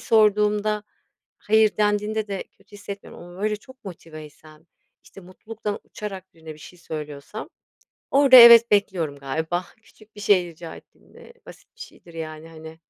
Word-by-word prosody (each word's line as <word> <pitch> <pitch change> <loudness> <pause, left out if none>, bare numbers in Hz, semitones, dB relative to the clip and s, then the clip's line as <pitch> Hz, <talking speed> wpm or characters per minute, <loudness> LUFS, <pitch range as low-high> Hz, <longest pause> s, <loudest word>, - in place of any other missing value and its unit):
sorduğumda 210 -1 +2 0.6
hayır 220 0 +2
dendiğinde 210 +1 -1
de 195 -1 -4 0.2
kötü 200 +1 -28
hissetmiyorum 200 -2 -10
ama 175 +3 -11
böyle 210 0 0
çok 260 +4 -19
motiveysem, 155 -3 -13 0.4
işte, - - -15
mutluluktan 205 +3 -7
uçarak 190 -3 -9
birine 160 -1 -11
bir - - -18
şey 155 +4 -14
söylüyorsam 150 - -8 0.6
orada 275 -1 +6
evet 235 -1 +9
bekliyorum 180 -8 0
galiba. 160 +6 -3 0.2
Küçük 220 -1 -23
bir 205 - -10
şey 195 -3 +3
rica 165 -1 -11
ettiğimde. 475 - -18
Basit - - -16
bir 475 - -14
şeydir, 175 - -14
yani, 160 -1 -8
hani. 160 0 -12
195 Hz, 145 wpm, -23 LUFS, 160-215 Hz, 0.6 s, evet